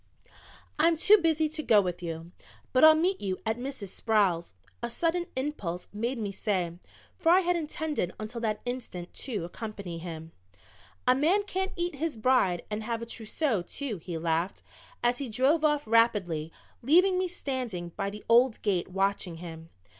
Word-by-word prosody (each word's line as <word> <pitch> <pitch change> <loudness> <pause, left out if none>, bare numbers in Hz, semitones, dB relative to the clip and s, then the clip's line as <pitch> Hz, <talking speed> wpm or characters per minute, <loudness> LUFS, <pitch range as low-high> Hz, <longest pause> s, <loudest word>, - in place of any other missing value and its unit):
"I'm 330 +1 +4
too 415 +6 +7
busy 320 -2 +2
to 310 +1 -4
go 220 -8 +5
with 180 -2 -2
you, 165 0 -6 0.4
but 255 - +4
I'll 315 0 +10
meet 360 +5 +1
you 190 -2 -2
at 220 +2 0
Mrs. 255 -6 -5
Sproul's," 185 - +1 0.3
a 235 - -2
sudden 340 +7 0
impulse 260 - -3
made 235 +5 -2
me 210 -3 -3
say, 185 -4 -2 0.4
for 330 - +2
I 370 +2 +6
had 355 -1 +1
intended 310 - -2
until 220 +2 -5
that 215 -2 -1
instant 245 -8 -5
to 210 -10 -3
accompany 195 -3 -6
him. 165 -1 -7 0.8
"A 250 - +7
man 330 +10 +3
can't 380 -1 -2
eat 345 -1 -2
his 310 -3 -2
bride 215 -7 +2
and 210 +1 -2
have 230 +1 -3
a - - -4
trousseau, 230 - -1
too," 230 +5 -4
he 170 0 -6
laughed, 165 +2 -1 0.4
as 240 0 +2
he 275 -3 -4
drove 270 +8 +2
off 295 -1 +2
rapidly, 205 -9 +2 0.3
leaving 365 +8 +4
me 370 - +1
standing 255 - -4
by 200 +3 -3
the 210 +1 -9
old 240 0 +5
gate 190 -5 +1
watching 195 -2 -1
him. 165 -1 -9
230 Hz, 170 wpm, -29 LUFS, 180-300 Hz, 0.8 s, I'll